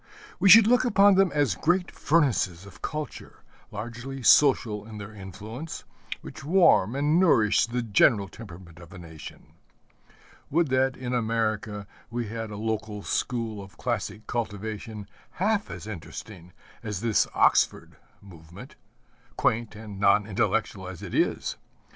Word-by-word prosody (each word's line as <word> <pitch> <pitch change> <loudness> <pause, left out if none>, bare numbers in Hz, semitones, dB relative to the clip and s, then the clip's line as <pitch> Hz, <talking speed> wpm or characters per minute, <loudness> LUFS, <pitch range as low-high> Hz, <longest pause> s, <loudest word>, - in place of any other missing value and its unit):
We 195 - +4
should 220 +3 +10
look 245 +3 +4
upon 205 -4 +5
them 190 -1 +3
as 145 -8 +1
great 175 - 0
furnaces 115 - +1
of 100 - -15
culture, 150 -2 -6 0.3
largely 120 +5 -7
social 120 -7 +4
in 110 -1 -9
their 105 +1 -9
influence, 105 - -8 0.4
which - - -10
warm 160 - +4
and 150 +4 +2
nourish 115 - +4
the 120 +1 -2
general 105 -1 +3
temperament 90 -6 -12
of 85 0 -14
a - - -10
nation. 80 -3 -12 1.0
Would 165 0 +1
that 130 0 +1
in 125 -1 -4
America 110 -3 -1 0.2
we 120 -2 -4
had 115 0 -5
a 105 - -7
local 110 -1 -3
school 115 -4 -2
of 95 0 -15
classic 110 -2 -3
cultivation 110 -2 -5 0.3
half 205 +2 0
as - - -8
interesting 90 -2 -9 0.3
as 105 -3 -5
this 115 -2 +2
Oxford - - +2 0.3
Movement 85 -3 -13 0.6
quaint 115 -1 0
and 105 -2 -9
non 100 +1 +4
intellectual 105 -2 -1
as 95 -2 -9
it - - -7
is! - - 0
110 Hz, 140 wpm, -26 LUFS, 100-135 Hz, 1.0 s, should